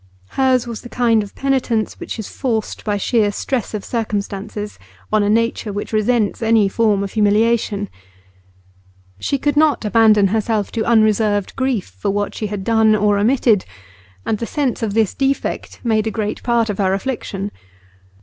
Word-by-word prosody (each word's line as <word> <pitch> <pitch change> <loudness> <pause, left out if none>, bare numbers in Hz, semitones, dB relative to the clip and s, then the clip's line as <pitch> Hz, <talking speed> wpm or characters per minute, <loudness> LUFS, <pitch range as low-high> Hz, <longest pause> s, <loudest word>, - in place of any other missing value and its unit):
Hers 260 -2 +2
was 235 -2 -6
the 240 - -10
kind 235 -3 +2
of 205 -1 -9
penitence 255 -5 -1
which - - -6
is 220 - -5
forced 225 -5 -3
by 205 -1 -1
sheer 210 0 +1
stress 230 +1 -3
of 205 - -5
circumstances 210 -2 -4 0.3
on 215 - +4
a 205 - +1
nature 230 0 0
which 205 +2 -5
resents 215 0 +1
any 225 -2 +3
form 205 -1 +1
of 195 - -5
humiliation; 210 -1 +1 1.3
she 280 - -1
could 290 +1 0
not 300 -5 +3
abandon 210 -2 +4
herself 215 0 0
to 225 - -1
unreserved 215 -3 +2
grief 260 -6 0
for 95 - -5
what 205 +1 -1
she 215 - -3
had 200 -1 -5
done 220 0 +4
or 205 -1 +2
omitted, 225 -2 +3 0.6
and 215 - -1
the 230 - -3
sense 280 -5 -1
of 215 -2 -2
this 220 -3 +2
defect 275 0 -2
made 220 -2 +1
a 220 - -4
great 210 -1 -2
part 235 -2 +1
of 200 - -7
her 190 -1 +2
affliction. 200 -3 -4
220 Hz, 170 wpm, -19 LUFS, 205-235 Hz, 1.3 s, on